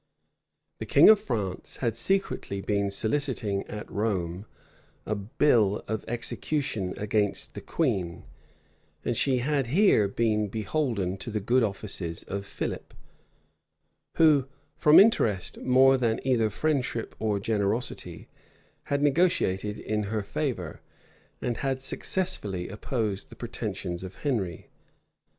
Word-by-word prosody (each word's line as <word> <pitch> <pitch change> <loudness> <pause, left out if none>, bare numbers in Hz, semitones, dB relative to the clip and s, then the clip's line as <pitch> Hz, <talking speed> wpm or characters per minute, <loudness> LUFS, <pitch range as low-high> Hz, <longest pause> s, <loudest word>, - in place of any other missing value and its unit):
The - - -5
king - - +7
of 215 -2 +8
France 100 - -4
had 115 -4 -1
secretly 190 - 0
been 100 0 0
soliciting 110 -1 -1
at 105 - -7
Rome 95 -2 -2 0.6
a 105 - -1
bull 105 0 +2
of 110 -1 -2
excommunication 120 -3 -2
against 105 -1 -1
the - - -7
queen; 95 - -1 0.8
and - - 0
she 135 -2 +2
had 135 +1 0
here 155 - +4
been 105 0 +1
beholden 110 -3 -1
to 95 - -7
the 105 -1 -1
good 120 +6 +2
offices 95 -5 -3
of 100 +1 -5
Philip, - - -5 1.2
who, 150 -5 +5 0.3
from 150 -1 +7
interest 115 - +3
more 130 +1 +5
than 115 -3 +1
either 120 -4 +2
friendship 130 -1 -1
or 105 -2 0
generosity, 105 +3 -2 0.6
had 140 0 0
negotiated 130 - +2
in 105 -1 -2
her 105 +1 -2
favor, 100 - -3 0.6
and 120 -2 -1
had 135 -1 -1
successfully 130 - -2
opposed 105 -2 -3
the - - -12
pretensions 100 -7 -5
of 95 0 -8
Henry. 100 - -2
110 Hz, 120 wpm, -27 LUFS, 100-135 Hz, 1.2 s, of